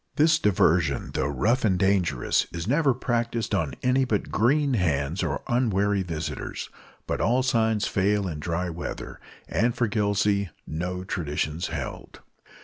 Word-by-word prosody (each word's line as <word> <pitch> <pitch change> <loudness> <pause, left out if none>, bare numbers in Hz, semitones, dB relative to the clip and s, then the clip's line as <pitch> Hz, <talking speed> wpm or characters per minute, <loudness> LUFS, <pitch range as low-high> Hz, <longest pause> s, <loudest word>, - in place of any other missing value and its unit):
This 155 +1 +4
diversion, 85 - +2
though 65 - 0
rough 100 - +1
and 95 -5 +3
dangerous, 90 -9 +1
is 85 +2 -5
never 145 +2 +3
practised 120 -3 -1
on 80 -10 0
any 125 +1 +3
but 110 -5 -1
green 140 +5 +2
hands 80 - 0
or 70 -6 -2
unwary 105 -5 +1
visitors; 80 -4 -5 0.3
but - - -2
all 125 +3 +2
signs 110 -4 +2
fail 100 0 +1
in 80 -4 -4
dry 85 +3 -2
weather, 85 0 -6 0.3
and 115 +8 +1
for 120 -1 +1
Gillsey 100 -2 +1 0.2
no 90 +3 -4
traditions 80 -2 -2
held. 70 -5 -6
100 Hz, 140 wpm, -26 LUFS, 85-115 Hz, 0.3 s, This